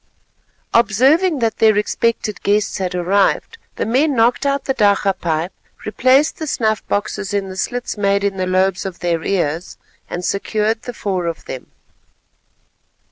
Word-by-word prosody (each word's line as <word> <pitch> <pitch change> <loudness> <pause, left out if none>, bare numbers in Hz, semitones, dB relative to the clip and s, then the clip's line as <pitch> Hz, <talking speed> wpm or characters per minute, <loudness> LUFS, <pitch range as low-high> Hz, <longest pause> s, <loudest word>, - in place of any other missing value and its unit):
Observing 270 - +3
that 230 -3 0
their 220 -2 +4
expected 210 -2 -1
guests 205 0 +1
had 185 -1 -2
arrived, 195 - +1 0.2
the - - -2
men 275 +5 +2
knocked 240 +4 +2
out 280 0 0
the 265 - +1
dakka 200 -3 +3
pipe, 165 +1 -2 0.3
replaced 260 +7 +3
the 315 - -4
snuff 220 -5 0
boxes 205 -1 -2
in 195 -1 -1
the 185 - -7
slits 245 +3 -3
made 200 0 +2
in 200 -1 -1
the 185 0 -1
lobes 185 0 +1
of 190 -3 -6
their 170 -2 -1
ears, 175 -2 -2 0.3
and 175 0 -4
secured 215 +2 -1
the 245 - -7
four 185 -5 -2
of 165 - -5
them. 130 - -7
205 Hz, 155 wpm, -19 LUFS, 185-235 Hz, 0.3 s, their